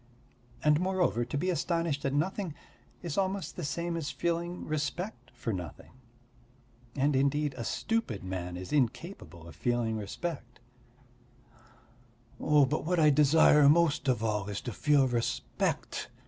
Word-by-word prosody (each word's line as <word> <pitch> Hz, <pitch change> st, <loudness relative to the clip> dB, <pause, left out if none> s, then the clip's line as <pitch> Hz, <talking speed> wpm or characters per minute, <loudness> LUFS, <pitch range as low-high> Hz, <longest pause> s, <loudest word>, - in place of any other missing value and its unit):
And, 150 Hz, 0 st, +4 dB
moreover, 185 Hz, -10 st, +1 dB
to 125 Hz, +4 st, -3 dB
be 185 Hz, +6 st, 0 dB
astonished 165 Hz, -4 st, -1 dB
at 135 Hz, -, 0 dB
nothing 175 Hz, +1 st, -1 dB, 0.5 s
is 170 Hz, +1 st, -2 dB
almost 190 Hz, 0 st, -2 dB
the 175 Hz, -, -5 dB
same 170 Hz, +3 st, -2 dB
as 160 Hz, -3 st, -3 dB
feeling 170 Hz, +2 st, -2 dB
respect 155 Hz, -, -3 dB
for 120 Hz, -2 st, -4 dB
nothing. 90 Hz, -5 st, -7 dB, 1.0 s
And 140 Hz, +1 st, +2 dB
indeed 140 Hz, +2 st, +1 dB
a 120 Hz, -, -5 dB
stupid 225 Hz, -, -2 dB
man 90 Hz, -1 st, -4 dB
is 90 Hz, +9 st, -7 dB
incapable 130 Hz, -, -2 dB
of 80 Hz, -, -11 dB
feeling 120 Hz, +2 st, 0 dB
respect." 120 Hz, -, -5 dB, 1.8 s
"But 150 Hz, 0 st, +3 dB
what 175 Hz, +2 st, 0 dB
I 150 Hz, -1 st, +6 dB
desire 150 Hz, 0 st, +6 dB
most 160 Hz, -2 st, +3 dB
of 125 Hz, -4 st, +1 dB
all 105 Hz, -2 st, -1 dB
is 100 Hz, -, -3 dB
to 120 Hz, -, -5 dB
feel 145 Hz, +2 st, +3 dB
respect. 120 Hz, -2 st, -2 dB
145 Hz, 135 wpm, -30 LUFS, 120-170 Hz, 1.8 s, I